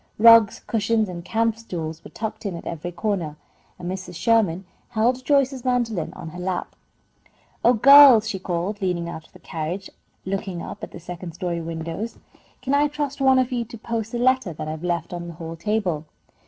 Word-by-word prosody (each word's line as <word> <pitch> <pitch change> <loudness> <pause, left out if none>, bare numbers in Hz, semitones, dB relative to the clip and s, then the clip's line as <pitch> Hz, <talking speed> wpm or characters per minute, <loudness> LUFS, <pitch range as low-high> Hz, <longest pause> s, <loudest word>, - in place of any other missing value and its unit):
Rugs, 230 -1 +7
cushions, 225 -1 0
and 175 -1 -6
camp 225 +3 +1
stools 165 -7 -6
were - - -10
tucked 220 -1 -5
in 185 - -4
at 170 - -8
every 170 +1 -5
corner, 175 -4 -2 0.4
and 175 - -7
Mrs. 185 -1 -5
Sherman 200 -4 +2 0.2
held 245 +2 +1
Joyce's 270 -2 +2
mandolin 240 -8 0
in 165 - -6
her 175 +3 -9
lap. 180 0 -3 0.9
"Oh, 240 - +6
girls!" 265 -2 +8
she 200 -3 -3
called, 185 +3 -3
leaning 180 -3 -1
out 160 -2 -7
of - - -33
the - - -13
carriage 165 +5 -5 0.3
and 190 - -3
looking 195 -3 -3
up - - -8
at - - -5
the - - -10
second 175 0 -8
story 175 0 -3
windows. 165 +6 -5 0.5
"Can 265 - -1
I 290 +1 +4
trust 290 -1 -4
one 265 -1 +5
of 255 0 +2
you 240 -2 0
to 230 +1 -10
post 225 0 -4
the 240 - -2
letter 255 -6 +2
that 155 - -6
I - - -3
have 160 +1 -7
left 175 -1 -2
on 175 0 -5
the 170 - -7
hall 165 0 -7
table?" 180 -4 -1
195 Hz, 200 wpm, -23 LUFS, 170-230 Hz, 0.9 s, girls